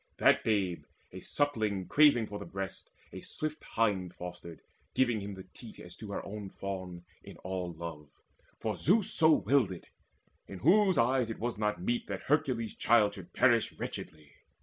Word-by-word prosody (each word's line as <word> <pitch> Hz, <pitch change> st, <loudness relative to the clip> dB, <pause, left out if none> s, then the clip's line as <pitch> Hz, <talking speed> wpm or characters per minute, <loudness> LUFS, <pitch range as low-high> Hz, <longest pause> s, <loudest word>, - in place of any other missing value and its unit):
That -, -, +4 dB
babe, 100 Hz, -6 st, 0 dB, 0.3 s
a -, -, -8 dB
suckling 110 Hz, -10 st, -1 dB
craving 145 Hz, -6 st, +5 dB
for 105 Hz, -1 st, -7 dB
the 100 Hz, -, -7 dB
breast, 95 Hz, 0 st, -6 dB, 0.2 s
A -, -, -7 dB
swift 155 Hz, 0 st, -5 dB
hind 95 Hz, -5 st, 0 dB
fostered, 90 Hz, -2 st, -9 dB, 0.3 s
giving 120 Hz, -5 st, +2 dB
him 100 Hz, 0 st, -6 dB
the 95 Hz, -, -9 dB
teat 115 Hz, -3 st, -12 dB
As 90 Hz, 0 st, -11 dB
to 110 Hz, -, -9 dB
her -, -, -4 dB
own 105 Hz, -1 st, -6 dB
fawn 95 Hz, -3 st, -6 dB, 0.2 s
in -, -, -11 dB
all 90 Hz, -1 st, -3 dB
love; 80 Hz, -3 st, -8 dB, 0.5 s
for -, -, -2 dB
Zeus 200 Hz, +5 st, +2 dB
So 160 Hz, -1 st, +5 dB
willed 140 Hz, -8 st, +3 dB
it, 90 Hz, -, -10 dB, 0.6 s
in 95 Hz, -, -8 dB
whose 190 Hz, -, +4 dB
eyes 125 Hz, 0 st, +2 dB
it 115 Hz, -, -4 dB
was 120 Hz, -1 st, -3 dB
not 105 Hz, -4 st, -1 dB
meet 120 Hz, +4 st, -1 dB
That 100 Hz, -2 st, -5 dB
Hercules' 130 Hz, -6 st, 0 dB
child 110 Hz, -3 st, +4 dB
should 95 Hz, -4 st, -11 dB
perish 120 Hz, -3 st, +3 dB
wretchedly. 75 Hz, -2 st, -7 dB
105 Hz, 170 wpm, -31 LUFS, 95-120 Hz, 0.6 s, craving